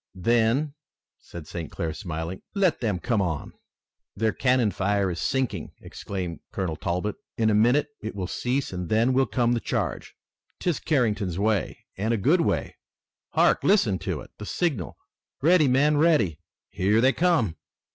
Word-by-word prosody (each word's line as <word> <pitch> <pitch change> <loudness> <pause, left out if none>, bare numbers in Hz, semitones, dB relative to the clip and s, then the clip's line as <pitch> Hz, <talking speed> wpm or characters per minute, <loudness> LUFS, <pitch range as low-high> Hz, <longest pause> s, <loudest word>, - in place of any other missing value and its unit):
"Then," 120 - +2 0.5
said 85 -3 -10
St. 80 0 -6
Clair, 80 -2 -3
smiling, 85 -1 -5
"let 190 -7 +2
them 105 -6 0
come 110 +3 0
on." 80 -5 -3 0.6
"Their 110 -1 +1
cannon 125 -4 +2
fire 100 0 0
is 85 - -4
sinking!" 130 -2 -1
exclaimed 90 -4 -6
Colonel 90 -5 -2
Talbot. 90 +6 -2 0.2
"In 110 -1 +3
a - - +2
minute 120 +8 +3
it 110 -1 -5
will 95 -2 -3
cease 125 +6 -2
and 90 -2 -4
then 115 +4 +3
will 135 0 +3
come 120 +3 +1
the 120 - +1
charge! - - -3 0.4
'Tis 175 -4 0
Carrington's 105 - 0
way, 105 0 -1
and 110 +4 0
a - - -1
good 155 - +3
way! - - -1 0.6
Hark! - - +3
Listen 115 - +3
to - - -3
it! - - -13
The 105 - -7
signal! 140 - -2 0.4
Ready, 160 0 +5
men! 145 +4 +3
Ready! 145 - +3 0.3
Here 105 +4 +2
they 130 +3 +4
come!" 160 - +1
110 Hz, 160 wpm, -25 LUFS, 95-130 Hz, 0.6 s, Ready